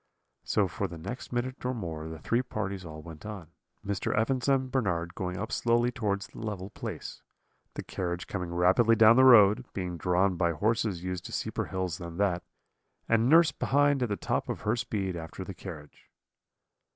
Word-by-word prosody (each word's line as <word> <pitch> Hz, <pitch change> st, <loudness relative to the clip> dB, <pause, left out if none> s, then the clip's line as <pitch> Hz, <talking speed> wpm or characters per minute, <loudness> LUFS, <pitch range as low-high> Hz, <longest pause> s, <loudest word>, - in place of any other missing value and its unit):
"So 100 Hz, -2 st, +1 dB
for 95 Hz, +4 st, -3 dB
the 85 Hz, -, -9 dB
next 100 Hz, +11 st, -7 dB
minute 125 Hz, +1 st, -3 dB
or 125 Hz, 0 st, -1 dB
more 80 Hz, -7 st, -5 dB
the 80 Hz, -, -7 dB
three 115 Hz, +9 st, 0 dB
parties 100 Hz, -6 st, -4 dB
all 80 Hz, -2 st, -9 dB
went 80 Hz, -2 st, -10 dB
on, 100 Hz, -6 st, -8 dB, 0.3 s
Mr. 100 Hz, -1 st, -1 dB
Evans 125 Hz, +4 st, +1 dB
and 130 Hz, -1 st, +2 dB
Bernard 85 Hz, -9 st, -1 dB
going 90 Hz, -1 st, -4 dB
up 110 Hz, +3 st, -4 dB
slowly 120 Hz, +1 st, +2 dB
towards 100 Hz, -5 st, -2 dB
the -, -, -13 dB
level 100 Hz, -3 st, -5 dB
place; -, -, -7 dB, 0.5 s
the -, -, -4 dB
carriage 90 Hz, -1 st, -3 dB
coming 90 Hz, -3 st, -4 dB
rapidly 95 Hz, +7 st, +4 dB
down 110 Hz, +1 st, +7 dB
the 130 Hz, -, +6 dB
road, 115 Hz, -2 st, +7 dB
being 90 Hz, -2 st, -4 dB
drawn 90 Hz, +2 st, +1 dB
by 85 Hz, -1 st, +2 dB
horses 105 Hz, -1 st, 0 dB
used 90 Hz, -1 st, -4 dB
to -, -, -7 dB
steeper -, -, -2 dB
hills 95 Hz, -3 st, -3 dB
than 85 Hz, -1 st, -7 dB
that; 95 Hz, -3 st, +1 dB, 0.7 s
and 115 Hz, +2 st, +3 dB
nurse 165 Hz, +1 st, +6 dB
behind 145 Hz, 0 st, +2 dB
at 125 Hz, -, 0 dB
the 100 Hz, -, 0 dB
top -, -, -2 dB
of -, -, -3 dB
her 110 Hz, +2 st, +1 dB
speed 105 Hz, -6 st, -2 dB
after 80 Hz, +3 st, -6 dB
the 95 Hz, -, -7 dB
carriage. 85 Hz, -5 st, -11 dB
100 Hz, 190 wpm, -29 LUFS, 90-115 Hz, 0.7 s, down